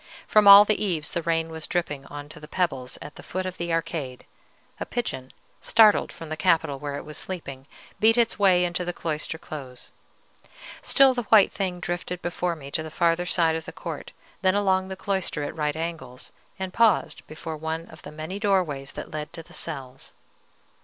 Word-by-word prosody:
From 210 -1 +4
all 200 +1 +11
the 215 0 +1
eaves 165 -7 -2
the 170 - -1
rain 165 0 0
was 160 -1 -5
dripping 150 -6 -2
on 145 0 -8
to - - -9
the 150 - -11
pebbles 135 -8 -2
at 145 - -11
the - - -9
foot 185 +1 -4
of 185 0 -5
the 170 0 -2
arcade: 155 -6 -3 0.5
a - - -3
pigeon, 130 - -4 0.3
startled 220 -2 +5
from 165 - -10
the 155 - -2
capital 155 -5 +2
where 145 0 -4
it - - -8
was 150 - -6
sleeping, 140 -7 -5 0.3
beat 225 +2 +5
its 235 -2 +2
way 185 -3 +5
into 175 +1 -2
the 175 0 -3
cloister 160 0 -3
close. 135 -6 -9 0.9
Still 270 -2 +5
the 245 -4 -4
white 215 -3 +7
thing 185 -3 -3
drifted 175 +1 -4
before 175 0 -1
me 140 -3 -10
to 160 - 0
the 160 - -6
farther 170 +2 +1
side 165 -3 +2
of 160 0 -5
the - - -7
court, - - -7 0.3
then 190 0 +3
along 190 -2 +2
the 190 - -5
cloister 190 -5 -2
at 145 - -5
right 150 -2 -1
angles, 160 -6 -6 0.3
and 190 -1 -5
paused 230 -3 +3
before 160 +1 -6
one 160 +1 -4
of 160 - -14
the - - -10
many 155 +6 -6
doorways 180 -10 0
that - - -7
led 155 0 -5
to 165 -1 -8
the - - -17
cells. 135 -5 -6
165 Hz, 200 wpm, -25 LUFS, 150-185 Hz, 0.9 s, all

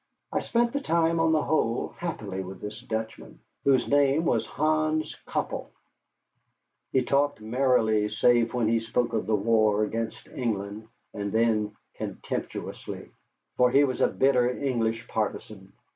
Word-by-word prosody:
I - - +1
spent 235 0 +1
the 280 - -1
time 165 -4 +2
on 165 0 +3
the 155 -2 +2
whole 120 -7 0
happily 105 - -4
with 95 +1 -9
this 105 +1 -7
Dutchman, 110 0 -5 0.3
whose 130 -3 +3
name 145 +3 +3
was - - +1
Hans 155 0 0
Köppel. - - -3 1.2
He 130 - +2
talked 140 +1 +1
merrily 110 -2 +2
save 115 +2 +3
when 120 -3 +1
he 115 +1 +3
spoke 115 +1 -1
of 110 -4 -1
the 110 - +3
war 110 0 +3
against 115 +2 -3
England, 110 -3 -3 0.3
and 100 -1 -3
then 110 -2 +1 0.2
contemptuously, - - -6 0.5
for 125 0 +5
he 140 +3 +5
was 130 -3 -1
a - - +5
bitter 125 -2 +3
English 120 -3 -1
partisan. 105 -2 -4
115 Hz, 145 wpm, -27 LUFS, 110-140 Hz, 1.2 s, for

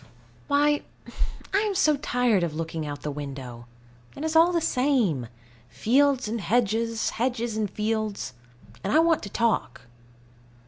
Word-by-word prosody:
Why, 290 +1 +3 0.7
I 390 - +4
am 415 -2 -1
so 305 -4 +4
tired 245 -7 +1
of 165 -3 -2
looking 160 -1 -4
out 145 0 -4
of - - -21
the 150 - -2
window. 135 -5 -7 0.5
It 285 - -6
is 320 0 -2
all 330 +2 +6
the 345 - +2
same: 250 - +1 0.4
fields 255 - +2
and 225 +1 -3
hedges, 225 +3 +1
hedges 235 -1 -1
and 215 -2 -1
fields; 215 -8 -2 0.5
and - - -1
I 300 - +4
want 330 0 +4
to 200 - -7
talk. 220 - 0
225 Hz, 150 wpm, -26 LUFS, -, 0.7 s, all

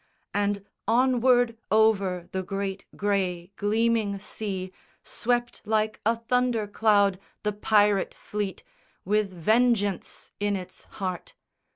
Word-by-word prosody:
And 205 -1 0 0.2
onward 245 0 +3
over 200 -5 +2
the 190 - -1
great 195 +1 -4
grey 190 -3 -1
gleaming 215 -1 +1
sea 195 -2 -5 0.3
Swept 240 0 -1
like 215 0 0
a 230 - +4
thunder 240 -1 0
cloud 205 -2 +3 0.2
the 210 0 0
pirate 205 -1 +2
fleet 205 -2 -4 0.4
With 210 0 +1
vengeance 205 +2 +1
in 205 0 +1
its 185 -2 -8
heart. 185 -3 -5
205 Hz, 105 wpm, -26 LUFS, 195-225 Hz, 0.4 s, a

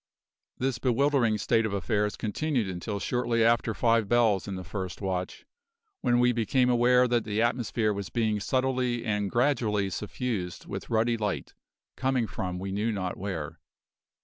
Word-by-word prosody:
This 130 -2 -1
bewildering 130 -3 +2
state 115 +2 +2
of 110 -2 -2
affairs 105 +2 0
continued 120 +1 -1
until 95 +3 -4
shortly 120 0 0
after 115 -1 +2
five 115 -3 +2
bells 115 -5 +3
in 100 - -4
the 95 - -6
first 90 +2 -5
watch, 95 -2 -3 0.6
when 120 - +3
we 125 0 +4
became 125 +2 +2
aware 125 +1 +4
that 120 -2 +1
the 105 0 -2
atmosphere 115 -2 0
was 100 -3 -5
being 110 -3 0
subtly 130 0 0
and 105 -2 0
gradually 115 -6 +1
suffused 105 -3 -4
with - - -6
ruddy 115 +1 +2
light, 105 -3 -3 0.4
coming 130 -2 +1
from 90 -3 -4
we 95 +1 -4
knew 105 +4 0
not 95 -4 -3
where. 85 -5 -5
110 Hz, 155 wpm, -28 LUFS, 100-120 Hz, 0.6 s, we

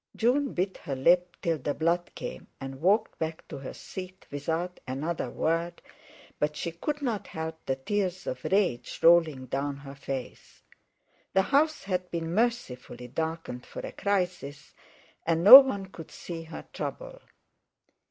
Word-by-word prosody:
June 265 +4 +2
bit 190 +2 -1
her 140 - -5
lip 175 +6 +3
till 165 -2 +1
the 145 +2 -2
blood 170 +2 +1
came, - - -7
and 135 0 -7
walked 205 +6 +2
back 160 0 -4
to - - -7
her 135 - -7
seat 185 0 -9
without 165 +5 -3
another 150 +6 -2
word, 170 +2 -1 0.6
but 150 0 0
she 170 - -3
could 290 - -4
not 225 -7 -2
help 160 0 -6
the 135 - +1
tears 185 +5 -2
of 130 0 -4
rage 185 -12 0
rolling 165 -6 +5
down 140 +2 -2
her 140 -1 -10
face. 135 -2 -7 0.7
The 190 - +4
house 295 +6 +2
had 180 -2 -2
been 165 -1 -3
mercifully 135 - -2
darkened 160 -3 -4
for - - -8
a - - -6
crisis, 180 -8 -2 0.5
and 165 0 +1
no 245 +8 +14
one 235 -8 -1
could 170 -4 -11
see 170 -2 -7
her 160 - -9
trouble. - - -6
170 Hz, 150 wpm, -28 LUFS, 145-195 Hz, 0.7 s, no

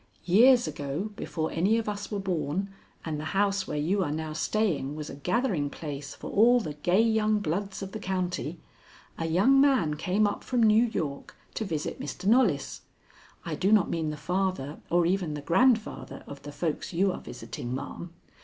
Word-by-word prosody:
Years 240 +7 +6
ago, 145 +9 -4
before 160 -4 -3
any 195 +7 +2
of 225 - -2
us 205 -1 -4
were 205 - -1
born, 190 0 -2 0.3
and 155 -2 -3
the - - -5
house 195 -1 +1
where 150 - -3
you 185 +7 +1
are 155 - -2
now 155 0 -3
staying 160 -6 0
was 150 0 -6
a - - -8
gathering 180 - 0
place 145 -1 -7
for - - -8
all 240 +4 +5
the 155 -10 -4
gay 175 +8 +2
young 220 -1 +2
bloods 195 +1 -3
of 195 - -6
the 220 - -5
county, 180 -4 -2 0.6
a 165 - -1
young 205 +12 +4
man 260 - +3
came 185 +7 +1
up 205 - -2
from 245 -2 +1
New 220 +2 +5
York 155 -11 -4 0.2
to 220 - -3
visit 160 -6 -3
Mr. 145 +5 -6
Knollys. 205 - +2 0.6
I - - -3
do 195 +3 +1
not 215 -4 +4
mean 160 -2 -1
the 150 - -5
father 180 -3 -2
or 175 0 +3
even 175 -3 0
the 145 - -5
grandfather 200 - +1
of 140 -1 -10
the 145 +1 -8
folks 160 +1 -3
you 190 +3 +2
are - - -6
visiting, 120 +2 -6
ma'am. 165 +5 -6
185 Hz, 190 wpm, -28 LUFS, 150-210 Hz, 0.6 s, Years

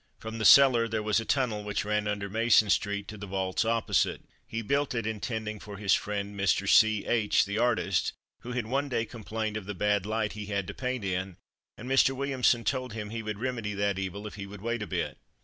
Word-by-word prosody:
From 110 +1 -7
the 110 - -1
cellar 130 -4 +7
there 110 -1 -2
was 110 +1 +2
a 115 - -5
tunnel 115 -6 0
which 105 0 -2
ran 105 0 0
under 105 -1 -2
Mason 110 0 +4
street 100 -1 0
to 105 - -8
the 100 - -7
vaults 95 0 -1
opposite. 115 0 +1 0.2
He 115 0 -4
built 140 +3 0
it 115 -2 -1
intending 110 0 -3
it - - -15
for 105 -1 -9
his 100 -1 +2
friend, 100 0 -1
Mr. 100 0 +1
C. 110 -1 +5
H, 110 -3 +2
the 100 +2 -2
artist, 120 -6 +1 0.3
who 125 - -7
had 120 -3 -2
one 135 +5 -1
day 115 -3 0
complained 110 -1 -4
of 100 -3 -8
the 105 - -4
bad 105 +1 +1
light 110 -1 -1
he 105 -1 -7
had 100 -2 -1
to - - -6
paint 125 -4 -3
in, 95 -1 -3 0.4
and 120 - -9
Mr. 135 0 +4
Williamson 130 -3 +1
told 130 -3 -2
him 105 -2 -6
he 115 0 -4
would 105 -1 -4
remedy 115 -3 -3
that 100 -1 0
evil 95 +2 -5
if 105 - -7
he 100 -1 -7
would 100 0 -11
wait 115 0 -2
a 105 - -4
bit. - - -3
105 Hz, 230 wpm, -28 LUFS, 100-115 Hz, 0.4 s, cellar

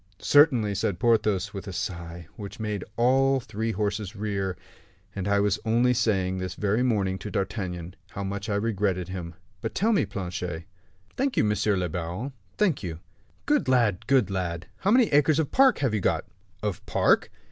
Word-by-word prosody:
"Certainly," 130 - +4
said 95 -1 -1
Porthos, 105 -3 +2
with 100 0 -7
a - - -4
sigh 85 -1 -5
which 100 0 -8
made 105 -2 -3
all 135 +3 +4
the 130 - -6
three 110 +2 -2
horses 105 0 -2
rear; 100 -3 -2 0.6
"and 100 -1 -3
I 100 0 +3
was 100 0 +1
only 120 +2 +3
saying, 95 -6 +1
this 95 -1 -4
very 105 +3 +1
morning, 100 -6 +1
to 105 - -6
D'Artagnan, 95 -3 -3
how 100 - -5
much 100 +2 -4
I 100 - 0
regretted 100 -4 0
him. 85 -3 -6 0.3
But 115 - -4
tell 225 +3 +2
me, 185 - +2
Planchet?" 90 -3 -4 0.5
"Thank 270 0 0
you, - - +4
monsieur 105 -1 +1
le 90 -1 0
baron, 90 - -4 0.2
thank 185 -10 +2
you." 85 -5 -5 0.5
"Good 295 0 +2
lad, 115 -5 +2
good 130 -8 +3
lad! 85 -3 -3
How 195 - -1
many 245 +3 +6
acres 145 +1 +4
of 160 -3 0
park 265 -3 +5
have 120 - +1
you 105 - 0
got?" - - +1 0.4
"Of 105 -4 -2
park?" - - +3
105 Hz, 180 wpm, -26 LUFS, 95-120 Hz, 0.6 s, many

